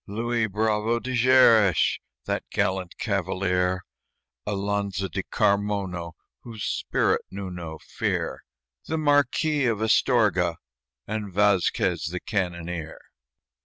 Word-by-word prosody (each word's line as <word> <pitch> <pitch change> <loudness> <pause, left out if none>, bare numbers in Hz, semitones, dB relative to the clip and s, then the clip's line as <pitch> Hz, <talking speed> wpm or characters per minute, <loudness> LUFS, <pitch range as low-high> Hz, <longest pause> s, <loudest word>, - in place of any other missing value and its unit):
Luis 115 +2 -1
Bravo 110 +2 0
de 130 - -5
Xeres, 115 -7 +5 0.3
That - - -1
gallant 95 -3 -1
cavalier; 95 -2 0 0.6
Alonzo 100 -1 -1
de 85 - -3
Carmono, 100 -4 -1 0.3
Whose 115 -3 -8
spirit - - 0
knew 95 -1 -6
no 85 -3 -7
fear; - - -3 0.5
The 160 - -1
marquis 145 -1 +2
of 110 -3 0
Astorga, 105 - +2 0.5
and 105 -2 -4
Vasquez, 95 -4 +2
the 90 +2 -4
cannoneer. 85 -5 -3
100 Hz, 100 wpm, -25 LUFS, 90-110 Hz, 0.6 s, Xeres